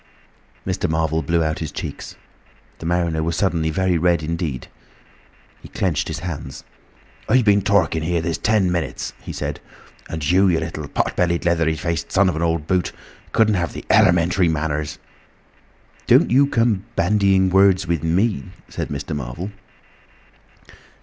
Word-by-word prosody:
Mr. - - -1
Marvel 80 0 0
blew 85 +2 +1
out 80 0 -2
his 80 - -4
cheeks. - - -7 0.6
The 80 - -5
mariner 85 -2 0
was 85 +1 -1
suddenly 85 -3 0
very 90 +1 +1
red 85 -1 +2
indeed; 80 -5 -3 0.9
he - - -11
clenched 80 -7 -1
his 80 -1 -5
hands. 70 -5 -6 0.7
"I 125 +3 +4
been 100 -1 +4
talking 95 -5 +2
here 85 +2 0
this 80 -3 -2
ten 105 -2 +2
minutes," 85 -2 -3
he - - -7
said; - - -4 0.5
"and 80 -3 -3
you, 95 +4 +4
you 85 -3 +2
little 80 -2 -5
pot - - -1
bellied, 85 -1 0
leathery 85 -2 +2
faced 85 0 -3
son 95 -1 +4
of 85 - -2
an 80 - -3
old 85 -2 0
boot, 90 +1 0 0.4
couldn't 110 -1 +3
have 85 -4 -1
the - - -8
elementary 90 +1 +4
manners—" 75 -2 -2 1.1
"Don't - - +5
you 140 +3 +5
come 115 -6 +1
bandying 95 0 +3
words 95 -1 +4
with 85 -3 -1
me," 85 - 0 0.2
said - - -4
Mr. 70 +1 -4
Marvel. 75 +9 -5
85 Hz, 155 wpm, -21 LUFS, 80-95 Hz, 1.1 s, Don't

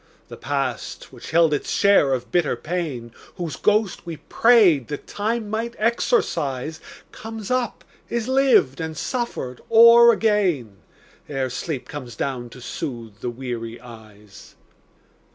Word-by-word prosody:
The - - -8
past 135 -3 -4
which - - -10
held 165 -1 +4
its 145 - -2
share 200 -9 +4
of 125 -1 -4
bitter 175 -7 +1
pain, 145 -6 -4 0.2
Whose 170 -5 -4
ghost 210 -2 +1
we 165 -2 -7
prayed 200 - +4
that 145 - -6
Time 220 +2 -2
might 225 +3 -3
exorcise, 160 - 0 0.3
Comes 225 0 -8
up, 255 -1 -1 0.3
is 235 -1 -2
lived 260 - +3
and 160 -1 -5
suffered 235 - -4
o'er 235 +1 +8
again, 190 - 0 0.5
Ere 135 -3 -2
sleep 135 +1 -4
comes 130 -5 -8
down 125 -3 -3
to 125 - -13
soothe 115 -5 -6
the 125 - -3
weary 120 -2 -6
eyes. 110 -4 -15
155 Hz, 135 wpm, -22 LUFS, -, 0.5 s, o'er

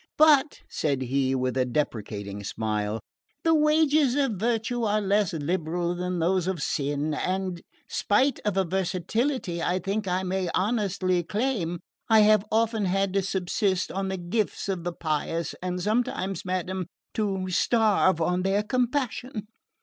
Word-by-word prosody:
But," 300 -2 +5
said 140 -4 -1
he 135 +1 +1
with 130 -1 -1
a 130 - +3
deprecating 105 -6 -3
smile, 105 +1 -2 0.4
"the 325 - +4
wages 305 -3 +4
of 275 -3 +2
virtue 225 +3 -1
are 215 -1 +2
less 200 -1 +2
liberal 170 +2 -1
than 180 0 -2
those 180 +1 +1
of 190 -3 -1
sin, 145 +1 -1
and 185 +2 -2 0.3
spite 260 +7 +2
of 210 -2 -1
a 195 - +4
versatility 190 - -1
I 180 +2 +1
think 195 +2 -2
I 185 +1 0
may 185 -1 -1
honestly 190 -3 +1
claim, 195 -3 -2 0.3
I 220 -1 +7
have 215 -1 +5
often 225 -1 +1
had 195 +1 +1
to 195 - +2
subsist 190 0 0
on 195 0 -2
the 190 0 -2
gifts 190 +5 -2
of 185 -4 -3
the 175 - -2
pious, 165 0 -2
and 180 0 -2
sometimes, 200 -3 -1
madam, 185 0 -2 0.3
to 195 -3 -1
starve 210 -4 +3
on 180 +2 +1
their 195 +2 +1
compassion." 250 -1 -1
190 Hz, 150 wpm, -26 LUFS, 170-215 Hz, 0.4 s, I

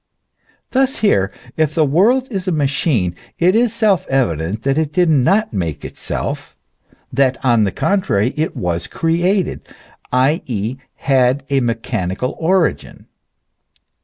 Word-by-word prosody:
Thus 265 0 +1
here; 95 - +2 0.3
if 155 -1 +1
the 155 - +3
world 220 - +3
is 190 -3 -4
a - - +2
machine, 135 - 0 0.2
it 180 +3 +3
is 235 0 +3
self 215 -7 +1
evident 95 - -1
that 135 0 +1
it 155 -1 0
did 175 +1 +2
not 155 - +2
make 85 -7 -3
itself, - - -5 0.6
that 130 0 +2
on 120 -4 +4
the 95 - -1
contrary 130 - 0
it 155 +1 -2
was 85 -1 -2
created, 175 +3 0 0.5
i. 130 +5 +2
e., 115 +1 -3 0.2
had 130 0 +1
a 135 - +3
me 120 -2 0
chanical 115 +1 -3
origin. 175 +1 0
140 Hz, 135 wpm, -18 LUFS, 115-180 Hz, 0.6 s, on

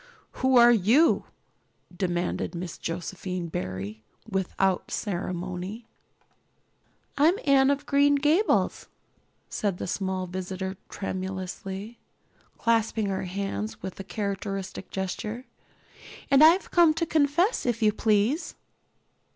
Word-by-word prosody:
"Who 260 0 +4
are 240 0 +8
you?" 240 - +4 0.7
demanded 175 -1 -2
Miss 170 -1 -6
Josephine 180 +1 -4
Barry, 95 - -5 0.3
without 190 -2 0
ceremony. 185 +2 -4 1.3
"I'm 320 +5 +5
Anne 275 -1 +5
of 280 0 0
Green 285 0 +4
Gables," 300 +9 +2 0.6
said 200 -4 -2
the - - -4
small 190 0 -2
visitor 185 +1 -4
tremulously, 190 +3 -5 0.6
clasping 225 -2 +1
her 190 -1 -2
hands 200 +3 -4
with 190 0 -6
her - - -4
characteristic 195 -1 -4
gesture, 210 +6 -4 0.9
"and 275 +2 +7
I've 335 +5 +5
come 335 -3 +5
to 335 +1 0
confess, 310 - +2
if 235 -1 0
you 210 -1 +4
please." 220 - +1
200 Hz, 105 wpm, -27 LUFS, 185-260 Hz, 1.3 s, are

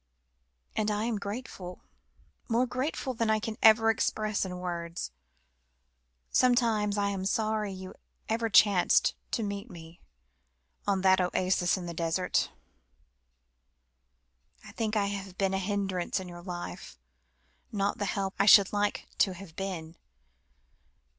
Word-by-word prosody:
"And 215 0 0
I 210 0 0
am 225 -2 -1
grateful, 200 -4 -7 0.7
more 240 +2 +3
grateful 260 +1 -3
than 230 -1 -1
I 220 - +4
can 220 0 -4
ever 225 0 +7
express 215 -1 -1
in 180 -1 -5
words. 170 - -4 1.2
Sometimes 230 -5 +3
I 200 0 +1
am 195 -2 -3
sorry 215 +1 0
you 185 0 -8 0.3
ever 225 +1 0
chanced 200 -3 +5 0.2
to 230 - -1
meet 200 +2 -4
me, 165 -2 -12 0.9
on 195 -2 +2
that 190 0 +5
oasis 180 0 +1
in 180 - -6
the 170 - -5
desert. 165 +2 0 2.2
I - - -10
think 220 -1 -2
I 205 -2 +2
have 195 -2 -5
been 195 -1 +1
a 190 - +1
hindrance 195 -2 -1
in 185 - -7
your 175 -1 -9
life, 175 - -7 0.7
not 200 -1 -1
the 205 - 0
help 195 0 -2
I 200 - +3
should 200 -2 +8
like 205 0 0
to 190 -2 +3
have 175 -3 -11
been. 175 -4 -5
200 Hz, 135 wpm, -29 LUFS, 185-215 Hz, 2.2 s, should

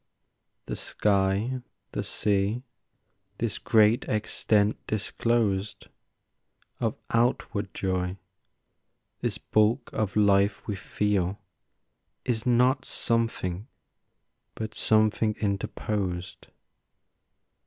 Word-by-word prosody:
The - - -4
sky, 100 +5 +1 0.3
the - - -2
sea, 105 +4 +1 0.7
this - - -2
great 110 +3 +4
extent 105 -1 +1
disclosed 105 -1 0 0.9
Of - - -1
outward 115 -2 +1
joy, 95 -1 -1 1.0
this - - -1
bulk 110 +4 +1
of 105 -3 -1
life 100 -1 +3
we 105 - -1
feel, 100 0 -1 0.9
Is 120 0 0
not 125 +2 +4
something, 115 -4 -1 0.9
but 110 -1 -5
something 110 0 +2
interposed. 95 -2 -2
105 Hz, 80 wpm, -27 LUFS, 100-115 Hz, 1.0 s, great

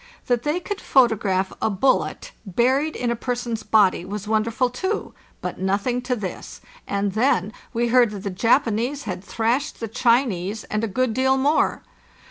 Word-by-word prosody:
That 245 -2 +1
they 300 +6 0
could 410 +2 -5
photograph 205 -7 +2
a - - +2
bullet 260 - 0
buried 260 - +1
in 245 -1 -1
a - - 0
person's 240 -1 -3
body 200 -5 +3
was 205 +2 -6
wonderful 225 +3 +1
too, 380 - -3 0.3
but - - -5
nothing 200 +6 0
to 250 0 -1
this. 200 -5 -6 0.3
And 200 0 -1
then 215 -2 +1 0.2
we 235 0 0
heard 245 -1 +5
that 205 -2 -7
the 200 - -3
Japanese 235 +6 +1
had 185 -1 -5
thrashed 235 +8 -1
the 225 - -3
Chinese, 225 -4 +1
and 215 +1 -3
a - - +1
good 245 +3 0
deal 265 +2 +2
more. 285 +4 +1
230 Hz, 165 wpm, -23 LUFS, 205-255 Hz, 0.3 s, heard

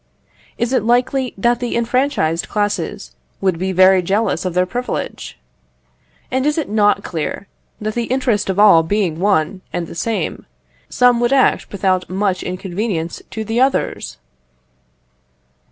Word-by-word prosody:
Is 235 +2 -1
it 255 - +3
likely 250 +3 +1
that 240 +4 +2
the 245 -1 -3
enfranchised 235 - 0
classes 205 - -2 0.3
would 185 -4 0
be 190 +1 -1
very 185 0 +5
jealous 195 +3 0
of 180 -2 -3
their 180 0 +3
privilege? 245 +6 -5 0.9
And 260 0 0
is 300 - +1
it 315 - -1
not 205 0 +2
clear, 170 +4 -4 0.3
that 215 0 -3
the 235 0 -1
interest 245 -5 0
of 190 - -1
all 205 -5 +7
being 170 -1 -1
one 185 -1 +1
and 175 - -3
the - - -10
same, 205 0 -3 0.4
some 245 -1 +3
would 240 +1 +1
act 270 -1 +2
without 190 -2 0
much 190 0 -1
inconvenience 185 -1 -3
to 220 - -5
the 225 +3 0
others? 265 - 0
205 Hz, 145 wpm, -18 LUFS, 185-240 Hz, 0.9 s, all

